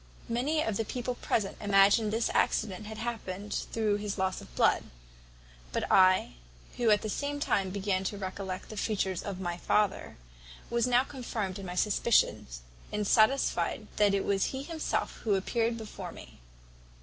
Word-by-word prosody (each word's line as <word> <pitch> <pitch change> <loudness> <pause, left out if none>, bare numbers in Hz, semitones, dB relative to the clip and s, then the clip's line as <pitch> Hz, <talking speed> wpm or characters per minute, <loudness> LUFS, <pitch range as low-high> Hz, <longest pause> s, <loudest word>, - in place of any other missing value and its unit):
"Many 285 +7 +1
of 220 -3 -1
the 225 - 0
people 250 +2 -3
present 215 -4 -1
imagined 205 +2 +4
this 225 +1 0
accident 210 -1 0
had 220 0 -7
happened 210 -4 -4 0.2
through 215 -2 +1
his 205 0 -4
loss 190 -1 -1
of - - -14
blood; - - +4 0.9
but - - -1
I, 185 - +5 0.4
who 240 -2 +2
at 210 -1 +4
the - - -2
same 285 +6 -2
time 195 -8 +1
began 190 0 -1
to 205 - -2
recollect 190 -1 -5
the 215 - -8
features 190 -3 -1
of 195 -2 -5
my 175 -2 -3
father, 205 +2 0 0.5
was 235 0 +2
now 250 +1 +4
confirmed 225 -8 -4
in 195 - -7
my 180 - -5
suspicion, 200 - +2 0.4
and 210 0 -1
satisfied 220 +7 +2
that 205 -1 +4
it 195 - -1
was 195 -1 +2
he 265 0 -4
himself 320 +1 -2
who 210 -3 +1
appeared 230 +4 0
before 220 -2 -7
me. - - -13
210 Hz, 165 wpm, -30 LUFS, 195-230 Hz, 0.9 s, I